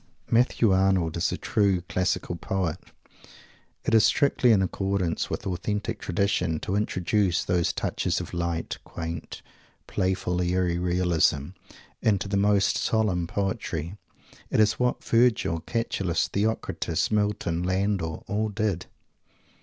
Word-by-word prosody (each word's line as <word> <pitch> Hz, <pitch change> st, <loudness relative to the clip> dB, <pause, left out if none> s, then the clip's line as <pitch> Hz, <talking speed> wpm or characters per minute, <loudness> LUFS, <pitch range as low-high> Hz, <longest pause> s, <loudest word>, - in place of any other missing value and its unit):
Matthew 115 Hz, -2 st, +3 dB
Arnold 95 Hz, -3 st, +2 dB
is 85 Hz, -, +1 dB
a -, -, -2 dB
true 100 Hz, -4 st, +1 dB
classical 90 Hz, 0 st, -1 dB
poet. 90 Hz, -2 st, -2 dB, 1.1 s
It -, -, 0 dB
is 110 Hz, -1 st, +6 dB
strictly 130 Hz, -3 st, +3 dB
in 100 Hz, -3 st, +4 dB
accordance 95 Hz, -2 st, -1 dB
with -, -, -3 dB
the 95 Hz, -, -2 dB
authentic 105 Hz, +4 st, -3 dB
tradition 90 Hz, -3 st, 0 dB
to 95 Hz, -, -2 dB
introduce 95 Hz, -2 st, +1 dB
those 90 Hz, -1 st, +1 dB
touches -, -, -1 dB
of -, -, -7 dB
light, 85 Hz, -1 st, -2 dB
quaint, 80 Hz, -1 st, -6 dB, 0.4 s
playful, 90 Hz, -1 st, -1 dB
airy 90 Hz, -1 st, +1 dB
realism 85 Hz, -5 st, +1 dB, 0.5 s
into 100 Hz, -2 st, +1 dB
the 100 Hz, -, -1 dB
most 100 Hz, 0 st, +3 dB
solemn 95 Hz, -6 st, +1 dB
poetry. 95 Hz, -3 st, -3 dB, 0.5 s
It -, -, +1 dB
is 110 Hz, 0 st, +3 dB
what 125 Hz, 0 st, 0 dB
Virgil, 115 Hz, -8 st, +2 dB
Catullus, 95 Hz, -4 st, -1 dB
Theocritus, 110 Hz, +2 st, -1 dB
Milton, 105 Hz, -5 st, 0 dB
Landor, 95 Hz, -3 st, -1 dB
all 105 Hz, +2 st, -1 dB
did. 105 Hz, -4 st, -2 dB
95 Hz, 125 wpm, -26 LUFS, 85-105 Hz, 1.1 s, is